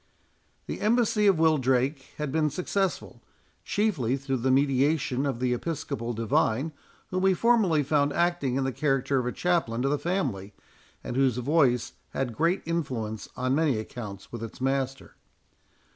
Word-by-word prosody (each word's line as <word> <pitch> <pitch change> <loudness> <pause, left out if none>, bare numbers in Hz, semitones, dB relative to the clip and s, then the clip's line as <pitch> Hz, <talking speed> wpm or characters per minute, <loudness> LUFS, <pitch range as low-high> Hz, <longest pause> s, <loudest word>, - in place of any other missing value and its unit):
The - - -5
embassy 215 -1 +3
of 195 -4 +5
Wildrake 135 -3 +2 0.2
had 150 -2 -3
been 155 0 +2
successful, 185 +5 -2 0.4
chiefly 155 - 0
through 135 -1 -2
the 130 +2 0
mediation 135 0 +2
of 130 -4 -2
the 125 -1 +1
Episcopal 120 -4 -3
divine, 115 +5 +1 0.4
whom 185 0 0
we 190 0 +4
formerly 205 -9 +3
found 145 0 +2
acting 170 -6 0
in 135 - +1
the 135 - 0
character 135 0 +1
of 125 - -2
a - - 0
chaplain 160 -10 0
to 135 - +2
the 145 0 0
family, 130 - -2 0.5
and - - -5
whose 130 -3 +2
voice 125 -2 +2 0.2
had 125 -4 -2
great 170 +4 +1
influence 125 -10 -3
on 130 +1 0
many 145 -4 +2
accounts 105 -3 -7
with 120 - -6
its 115 -1 -7
master. 135 0 -2
135 Hz, 155 wpm, -27 LUFS, 125-165 Hz, 0.5 s, of